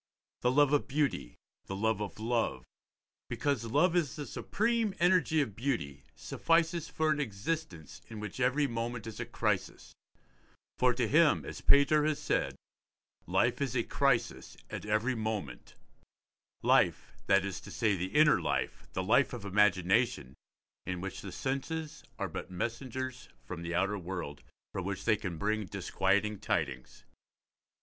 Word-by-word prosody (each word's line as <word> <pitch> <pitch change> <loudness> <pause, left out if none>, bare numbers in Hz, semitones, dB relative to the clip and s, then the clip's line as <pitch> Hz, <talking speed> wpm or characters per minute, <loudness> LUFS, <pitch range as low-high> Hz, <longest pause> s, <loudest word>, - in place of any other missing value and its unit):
The 125 - +3
love 145 +2 +4
of 145 - +2
beauty, 135 - -1 0.3
the 95 - -4
love 110 +1 0
of 105 - -5
love, 115 +1 0 0.7
because 140 -6 -1
love 150 +10 +3
is 165 -7 +1
the 145 - -5
supreme 225 +2 0
energy 175 -3 +4
of 110 -8 -3
beauty, 80 - -2
suffices 165 0 +1
for 155 0 +1
an 150 - 0
existence 110 - -4
in 110 - -7
which 105 +4 -6
every 130 +3 +2
moment 115 -2 -3
is 115 -2 -7
a - - -4
crisis; - - -2 0.9
for 125 0 +5
to 120 -2 +1
him, 155 +5 +4
as - - -7
Pater 140 +2 +5
has 155 -1 +1
said, - - -1 0.7
'life 95 - +2
is 135 -2 -1
a 120 - +2
crisis 135 -2 0
at - - -5
every 110 +4 +1
moment': 110 -2 -4 0.9
life, - - +3
that 100 -1 +4
is 100 - -4
to - - -11
say, 110 -4 +1
the 95 +2 -4
inner 150 0 +6
life, - - -2
the - - -1
life - - +3
of 100 - -6
imagination, 100 - +2 0.5
in 90 -1 -2
which 95 +1 -5
the 100 - -7
senses 150 - -3
are - - -4
messengers 125 +6 -4 0.2
from 90 -2 -6
the 85 0 -3
outer 100 +3 +1
world, 90 -5 -5 0.3
from 95 - -3
which 95 +1 -4
they 110 - +4
can 95 -4 -4
but 80 - -8
bring 110 0 +1
disquieting 105 +2 0
tidings. 65 -1 -3
115 Hz, 155 wpm, -31 LUFS, 100-145 Hz, 0.9 s, inner